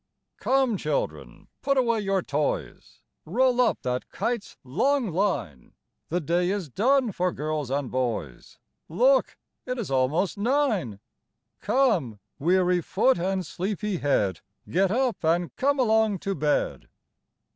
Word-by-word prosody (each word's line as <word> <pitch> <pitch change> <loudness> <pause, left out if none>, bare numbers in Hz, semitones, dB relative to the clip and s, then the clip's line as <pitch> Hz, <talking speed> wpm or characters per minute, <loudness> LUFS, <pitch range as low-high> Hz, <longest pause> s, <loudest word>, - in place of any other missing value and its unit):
"Come, 260 -5 +2
children, 150 -4 -3
put 275 -1 +1
away 235 -3 +2
your 195 -3 0
toys; 145 +1 -3 0.2
Roll 250 +7 +2
up 250 - +1
that 125 0 -2
kite's 235 -3 -3
long 225 - +1
line; 165 - -2 0.3
The 175 - 0
day 175 +2 0
is 195 -6 -2
done 250 - +2
for 180 -1 0
girls 150 -3 -3
and 140 -1 -2
boys 115 - -3 0.3
Look, 255 - +3 0.3
it 250 0 -2
is 210 - -4
almost 145 +10 +1
nine! 220 - 0 0.6
Come, 180 - +1 0.2
weary 180 +2 +2
foot, 220 +6 +2
and 190 +1 -1
sleepy 200 +1 -3
head, 105 - 0 0.3
Get 190 +3 +2
up, 245 0 0
and 170 +2 +1
come 285 +2 +1
along 220 -4 +3
to 195 - 0
bed." 150 -3 -1
185 Hz, 130 wpm, -26 LUFS, 150-235 Hz, 0.6 s, Look